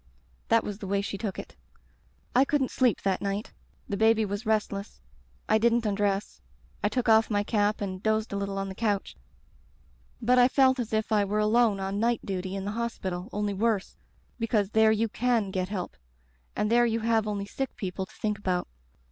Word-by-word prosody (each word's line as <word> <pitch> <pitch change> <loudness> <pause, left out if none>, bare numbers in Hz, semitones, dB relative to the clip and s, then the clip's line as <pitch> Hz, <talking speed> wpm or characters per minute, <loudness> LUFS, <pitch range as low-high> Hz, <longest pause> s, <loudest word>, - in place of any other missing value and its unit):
That 230 - +4
was 205 -1 -5
the 195 - -6
way 200 +1 +1
she 200 - -4
took 210 -4 -3
it. - - -8 0.8
"I 255 - +7
couldn't 275 -2 0
sleep 250 -4 +1
that 195 -1 0
night. 200 +2 -3 0.3
The 200 - -2
baby 220 +1 +4
was 205 +3 -4
restless. 210 -2 -1 0.5
I 220 - +4
didn't 235 +1 +2
undress. 200 - -1 0.4
I 205 - +3
took 245 +3 -1
off 220 0 +5
my 205 -2 +1
cap 210 -1 0
and 185 -2 -4
dozed 220 0 0
a - - -1
little 200 0 -3
on 195 0 -2
the 190 - -6
couch, 205 -1 -1 1.0
but 250 +2 +3
I 245 - +7
felt 260 0 +3
as 235 -2 -3
if 220 0 -1
I 210 -2 +4
were 205 +1 -1
alone 215 -1 +3
on 195 +1 -2
night 235 +1 +1
duty 190 -1 -3
in 195 0 -4
the 205 - -2
hospital, 205 -5 -4
only 210 0 -1
worse, 210 -1 0 0.4
because 220 -3 0
there 220 0 +5
you 220 +1 +1
can 230 -3 0
get 185 -1 -2
help, 190 -4 -4 0.6
and 210 +1 0
there 240 0 +5
you 230 0 -1
have 225 -1 +1
only 200 -1 -2
sick 270 +6 -4
people 190 -1 -4
to - - -19
think 210 -2 -2
about. 180 -3 -1
210 Hz, 200 wpm, -28 LUFS, 200-230 Hz, 1.0 s, I